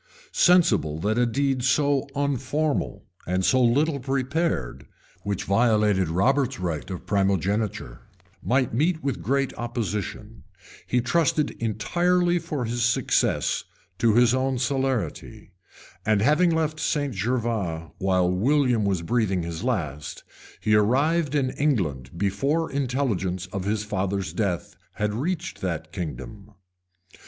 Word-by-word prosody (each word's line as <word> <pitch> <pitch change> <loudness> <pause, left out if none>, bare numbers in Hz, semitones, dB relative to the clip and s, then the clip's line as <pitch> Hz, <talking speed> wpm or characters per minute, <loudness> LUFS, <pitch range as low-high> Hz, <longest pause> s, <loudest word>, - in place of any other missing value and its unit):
Sensible 120 - +3
that 110 +5 +1
a 120 - +3
deed 135 +1 0
so 140 +1 +2
unformal, 140 +2 -1 0.2
and 90 +1 0
so 130 - +4
little 140 +5 +2
prepared, 135 - -2 0.3
which 100 -2 -3
violated 105 -3 +2
Robert's 130 - +1
right 85 -1 -3
of 90 -2 -6
promigeniture, 100 - 0 0.4
might 130 -1 +1
meet 160 +7 +1
with 140 -2 -2
great 135 +1 0
opposition, 115 -5 -4 0.4
he 125 - +1
trusted 150 +3 +1
entirely 175 - +1
for 155 -6 -3
success 115 0 +1 0.4
to 115 -2 +3
his 120 0 +5
own 130 0 0
celerity; 130 - -2 0.5
and 105 -1 +2
having 155 +7 +4
left 160 -1 0
St. 145 -3 -1
Gervas 105 -6 -2
while 95 -2 +2
William 120 +5 +2
was 95 -4 0
breathing 95 -3 0
his 85 +3 -5
last, 75 - -3 0.4
he 110 - +1
arrived 140 +9 +2
in 130 -3 +1
England 90 - -1
before 135 - 0
intelligence 120 -10 -1
of 95 -2 -3
his 105 +1 0
father's 100 -1 -2
death 100 -6 -2 0.2
had 105 0 -1
reached 170 - -3
that 80 -4 -3
kingdom. 90 - -7
120 Hz, 120 wpm, -25 LUFS, 95-140 Hz, 0.5 s, his